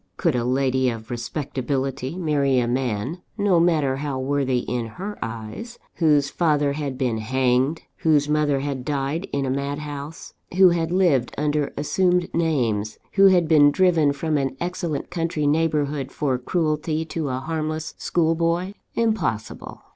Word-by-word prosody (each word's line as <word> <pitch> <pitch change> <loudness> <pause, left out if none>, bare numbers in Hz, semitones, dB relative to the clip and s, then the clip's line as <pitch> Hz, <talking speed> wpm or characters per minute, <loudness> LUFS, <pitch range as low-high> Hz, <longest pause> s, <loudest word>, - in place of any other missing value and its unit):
Could 165 -7 +1
a 120 - 0
lady 130 0 +1
of 115 -1 -6
respectability 135 +2 -3
marry 145 -6 +1
a 120 -1 +2
man 125 - -2 0.2
(no 200 -4 +3
matter 155 -6 +2
how 140 -1 -3
worthy 130 -1 0
in 120 -2 -2
her 195 - -6
eyes) 115 - -6 0.2
whose 150 -4 +3
father 150 -4 +1
had 140 -3 -4
been 120 -4 0
hanged, 130 +5 +1
whose 150 -3 +2
mother 150 -2 +1
had 140 -2 -3
died 145 +5 -2
in 140 -1 -1
a 130 - -1
madhouse, 145 +3 -5 0.2
who 190 -1 +8
had 165 -1 0
lived 170 -10 +2
under 150 -1 0
assumed 180 +4 +1
names, 120 -11 0
who 195 -1 +6
had 180 -3 +4
been 150 -2 +6
driven 165 -3 +3
from 150 +1 -1
an 135 -1 -2
excellent 175 -4 -3
country 165 -3 -1
neighbourhood, 145 -3 0
for 130 -4 -1
cruelty 155 +2 -1
to 160 -2 -3
a 130 - -2
harmless 155 +2 -3
school 165 -2 +1
boy? 170 +3 0 0.2
Impossible! 185 - -2
145 Hz, 150 wpm, -23 LUFS, 130-165 Hz, 0.2 s, who